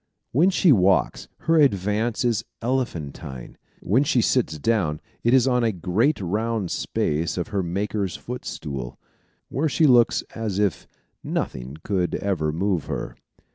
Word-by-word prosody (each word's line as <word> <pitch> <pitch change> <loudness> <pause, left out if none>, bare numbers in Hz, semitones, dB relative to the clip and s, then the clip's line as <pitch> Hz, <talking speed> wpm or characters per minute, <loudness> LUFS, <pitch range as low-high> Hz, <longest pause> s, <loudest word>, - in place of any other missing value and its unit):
When 160 +9 +4
she 180 -3 +4
walks, 95 -5 +3
her 165 0 +2
advance 110 -1 +1
is 115 -4 +1 0.2
elephantine. 85 - -4 0.3
When 120 +9 +2
she 135 -3 +2
sits 115 -9 +1
down 80 -4 0 0.2
it 120 - +3
is 130 0 +5
on 125 -2 +2
a 115 - +2
great 100 - +1
round 105 +1 -1
space 80 +4 -1
of 90 - -2
her 100 -3 0
Maker's 95 +1 -2
footstool, 75 - -6 0.5
where 150 +5 0
she 155 +3 +3
looks 120 -4 +5
as 110 -4 -3
if 100 -10 0 0.4
nothing 65 +3 -4
could 90 -4 0
ever 85 -6 -1
move 90 0 -1
her. - - -4
105 Hz, 140 wpm, -24 LUFS, 85-120 Hz, 0.5 s, is